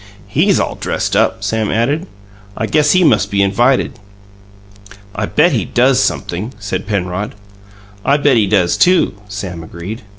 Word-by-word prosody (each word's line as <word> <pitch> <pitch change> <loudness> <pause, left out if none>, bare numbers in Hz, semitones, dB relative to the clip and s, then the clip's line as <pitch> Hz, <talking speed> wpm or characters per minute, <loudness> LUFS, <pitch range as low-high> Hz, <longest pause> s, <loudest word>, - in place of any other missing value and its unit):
"He's 165 - +2
all - - -1
dressed - - -2
up," - - +1
Sam 110 -2 -1
added. 140 - 0 0.5
"I 110 - -1
guess 150 +4 +2
he 185 - +4
must 160 - +3
be 100 0 +1
invited." 120 +5 +1 1.1
"I 105 0 -3
bet 165 +4 +3
he 115 -9 0
does 125 +6 +2
sumpthing," 105 +9 -2
said 100 -1 -5
Penrod. 100 0 -3 0.7
"I 140 - +3
bet 145 -2 +3
he 110 -3 +3
does, 95 -4 +2
too," 180 0 +3
Sam 95 -5 -6
agreed. 85 +8 -8
110 Hz, 155 wpm, -16 LUFS, 100-140 Hz, 1.1 s, he